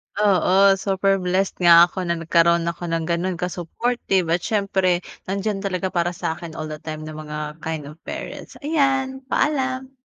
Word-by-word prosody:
Oo, 195 -1 +4
super 195 0 +1
blessed 185 +1 -1
nga 170 0 +7
ako 185 -2 -4
na 170 - +1
nagkaroon 170 +1 +3
ako 175 +1 -6
ng 165 -1 -1
gano'n 170 +3 -1
ka-supportive 180 +2 -1
at 170 - +3
siyempre 190 -4 +1 0.2
nandiyan 200 +2 -2
talaga 190 -1 -2
para 175 0 0
sa 165 -1 -3
akin 170 -2 -8
all 155 -1 -5
the 155 - -6
time 155 0 -7
ng 155 0 -7
mga 150 0 -6
kind 160 -1 -4
of 150 - -15
parents. - - -7
Ayan, 270 -3 0
paalam. 265 -2 -1
180 Hz, 165 wpm, -22 LUFS, 165-200 Hz, 0.2 s, nga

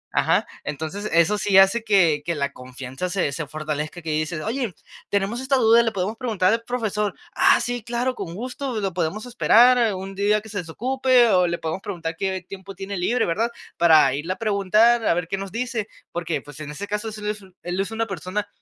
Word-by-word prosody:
Ajá. - - +3 0.2
Entonces 160 +8 -4
eso 170 +5 +3
sí 205 -2 +3
hace 195 +4 +5
que 180 -9 +3
que 170 - -1
la 140 -1 -1
confianza 130 +5 -6
se 180 -6 0
se 150 +1 -4
fortalezca 155 +2 -4
que 160 - -3
dices: 155 +1 -2
"Oye, 235 -2 -2 0.4
tenemos 205 +5 -1
esta 265 +1 +1
duda 230 -1 +6
y - - +1
le 225 - +1
podemos 200 +2 -3
preguntar 215 -6 +1
al 230 - 0
profesor". 215 -4 -2 0.2
"¡Ah - - +5
sí! 245 -1 -3
¡Claro! 240 +3 -1
Con 170 -6 -6
gusto 250 +2 -4
lo 195 -3 -2
podemos 180 +6 -2
esperar 240 -2 +4
un 190 +1 -6
día 205 +2 +2
que 220 - -13
se 200 - -3
desocupe 250 +7 +2
o 180 -3 +4
le 170 0 -1
podemos 160 +4 -4
preguntar 170 -5 -5
qué 190 -1 -2
tiempo 195 0 -9
tiene 195 +1 -5
libre, 220 +8 +1
¿verdad?, 220 +8 0 0.3
para 155 -5 +6
irle 160 +6 -2
a - - -11
preguntar 215 +2 +3
a - - +4
ver 175 -1 -2
qué 195 - -2
nos 195 0 -6
dice", 230 -2 -3 0.2
porque, 170 -1 -2
pues 145 0 -13
en 155 -1 -7
ese 175 +7 -6
caso, 210 +2 -3
es 215 - -8
el 210 0 -6
es 210 0 -9
u 190 -2 -17
él 175 +1 -3
es 195 0 -1
una 225 0 -1
persona 195 +2 -4
195 Hz, 220 wpm, -23 LUFS, 170-225 Hz, 0.4 s, duda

